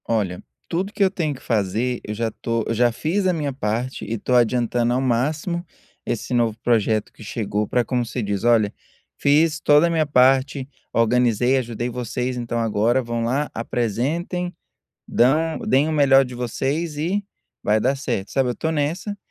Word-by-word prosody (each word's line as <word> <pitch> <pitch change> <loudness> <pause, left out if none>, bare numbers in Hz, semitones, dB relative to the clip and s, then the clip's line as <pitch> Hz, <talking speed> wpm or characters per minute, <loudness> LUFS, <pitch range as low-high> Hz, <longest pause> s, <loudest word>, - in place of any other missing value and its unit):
Olha, 100 -6 -1 0.2
tudo 185 +4 -2
que 205 - +1
eu 190 - +3
tenho 160 -6 -1
que - - -14
fazer, 115 +3 -1
eu 105 - -5
já 115 +1 -1
tô 115 +1 -2
eu - - 0
já 120 +1 +3
fiz 180 - -1
a 185 - +3
minha 150 -4 -2
parte. 125 +1 -3
E 115 - -3
tô 125 - -2
adiantando 120 0 +2
ao 130 - +1
máximo 150 +8 -1 0.4
esse 120 +2 -3
novo 115 -3 +1
projeto 110 -2 +1
que - - -13
chegou 105 -1 -2
pra 125 -1 +1
como 125 0 0
você 120 +2 -4
diz: 100 0 -2
"Olha, 115 -3 +3 0.4
fiz 155 +2 +3
toda 150 +3 +5
a - - 0
minha 160 -2 +2
parte, 135 0 +3 0.2
organizei, 120 +2 +2
ajudei 120 -1 -3
vocês, 125 +1 -3
então 120 -1 -3
agora 115 +3 +2
vão 120 0 -2
lá 135 +6 0
apresentem, 140 - -2 0.5
dão 155 +7 +2
deem 140 +4 +2
o - - -1
melhor 140 -3 +5
de 125 -1 -8
vocês 135 +6 -2
e 185 +7 -1 0.4
vai 105 +1 +2
dar 135 - +2
certo". 105 -8 -3
Sabe? 135 -2 +1
Eu 120 - -2
tô 160 - -2
nessa, 160 +7 -2
125 Hz, 180 wpm, -22 LUFS, 115-150 Hz, 0.5 s, toda